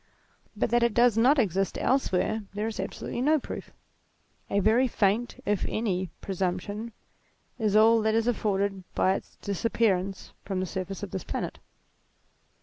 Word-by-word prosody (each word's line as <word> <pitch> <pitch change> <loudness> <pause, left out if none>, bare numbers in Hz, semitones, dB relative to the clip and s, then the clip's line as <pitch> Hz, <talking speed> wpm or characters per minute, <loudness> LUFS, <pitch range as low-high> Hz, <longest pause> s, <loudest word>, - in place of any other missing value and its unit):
But - - 0
that 240 0 +4
it 235 -2 +2
does 240 -2 +5
not 250 +6 +5
exist 195 -5 +1
else 265 -2 +1
where, 215 +4 0
there 210 +1 -1
is 225 -2 -4
absolutely 195 +5 -4
no 305 +4 +4
proof. - - -7 0.8
A 200 - +2
very 225 +6 +4
faint, 220 +1 0
if 205 -2 0
any, 190 -5 -1
presumption, 195 +4 -3 0.7
is 210 -2 +1
all 225 +1 +6
that 220 0 +1
is 225 0 +2
afforded 200 -4 0
by 190 - +3
its - - -6
dis 200 -3 -3
appearance 195 -4 0
from 195 -2 -3
the 185 - -1
surface 190 +1 -5
of - - -5
this - - -4
planet. - - -4
210 Hz, 160 wpm, -27 LUFS, 195-230 Hz, 0.8 s, all